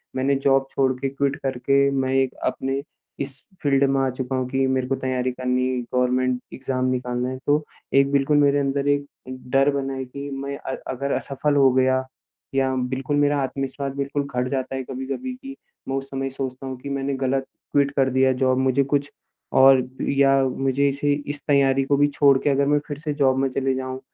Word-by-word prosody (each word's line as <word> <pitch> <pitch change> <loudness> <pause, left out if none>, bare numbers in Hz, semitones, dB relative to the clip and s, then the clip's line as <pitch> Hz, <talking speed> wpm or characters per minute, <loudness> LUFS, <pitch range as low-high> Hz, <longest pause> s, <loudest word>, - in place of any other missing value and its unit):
मैंने 135 +2 +1
जॉब 135 0 +2
छोड़ 135 -1 +1
के, 135 - -1
क्विट 140 0 -1
करके 140 +1 +2
मैं 135 -1 0
एक 135 -1 +2
अपने 135 +1 -1 0.4
इस 135 -1 -5 0.3
फ़ील्ड 140 -1 +3
में 135 0 +2
आ 135 - +1
चुका 130 +1 -3
हूँ 130 -1 -1
कि 135 +1 +1
मेरे 130 -1 0
को 135 - 0
तैयारी 130 -1 -1
करनी 125 0 0
है 130 -1 -1
गवर्नमेंट 125 0 +1
एग्जाम 130 -1 -2
निकालना 125 -1 -1
है 130 - -5
तो 150 +1 +3 0.3
एक 140 0 +4
बिल्कुल 140 +1 +3
मेरे 145 0 +4
अंदर 140 0 -1
एक 145 0 +2 0.5
डर 135 +1 +4
बना 135 -1 -2
है। 130 0 -4
कि 140 +3 -7
मैं 140 +1 -4
अ, 135 -2 -5 0.2
अगर 140 +2 -3
असफल 145 +2 -1
हो 135 -2 +5
गया, 130 0 +2 0.5
या 135 -1 +2
बिल्कुल 130 +2 -2
मेरा 145 0 +3
आत्मविश्वास 135 +1 -3
बिल्कुल 140 +1 -2
घट 125 0 0
जाता 135 -1 -2
है 130 - -3
कभी-कभी 135 - -5
कि 275 -1 -8 0.3
मैं 135 - -1
उस 135 0 -3
समय 135 0 -3
सोचता 130 0 -5
हूँ 130 -1 -5
कि 140 - -6
मैंने 140 0 -2
गलत 135 0 -1 0.3
क्विट 140 -1 +3
कर 135 -1 +3
दिया 130 0 +3
जॉब 130 -1 +3
मुझे 130 +1 +2
कुछ 140 +1 -1 0.4
और 130 -1 +6 0.2
या 135 0 +4
मुझे 135 +1 +1
इसे 145 +1 0 0.2
इस 145 0 -4
तैयारी 135 -2 +3
को 140 +1 +1
भी 145 +1 +4
छोड़ 140 -1 +4
के - - +2
अगर 140 0 +2
मैं 145 0 +3
फिर 145 - -5
से 150 -1 -3
जॉब 135 -2 +2
में 135 0 +1
चले 135 +1 0
जाऊँ। 130 0 -4
135 Hz, 205 wpm, -23 LUFS, 130-140 Hz, 0.5 s, और